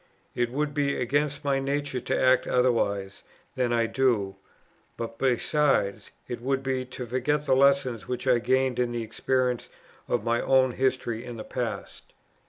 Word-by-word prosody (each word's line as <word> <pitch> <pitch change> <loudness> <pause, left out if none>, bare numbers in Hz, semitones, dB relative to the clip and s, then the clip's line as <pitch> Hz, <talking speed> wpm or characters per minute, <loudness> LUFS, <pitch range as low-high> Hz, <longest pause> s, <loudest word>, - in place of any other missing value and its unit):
It 120 -1 0
would 145 +3 -2
be 140 -1 0
against 145 +4 0
my 140 -1 +2
nature 140 -1 -2
to - - -1
act 130 0 +4
otherwise 100 -6 +1 0.3
than 125 -2 0
I 115 -1 +2
do; 115 -6 +1 0.6
but 115 0 -6
besides, 135 -4 +1 0.2
it 120 -1 -5
would 135 +1 -1
be 130 -1 -1
to 125 0 -7
forget 130 +5 0
the 130 - +3
lessons 130 -6 +3
which 125 0 -4
I 125 -2 +4
gained 130 +1 +1
in 120 -1 +1
the 120 -1 -2
experience 125 +2 -1 0.4
of 120 -3 0
my 120 +1 +1
own 130 -1 +3
history 125 -3 -1
in 120 -2 -7
the 110 - -6
past. - - -5
125 Hz, 165 wpm, -27 LUFS, 120-135 Hz, 0.6 s, act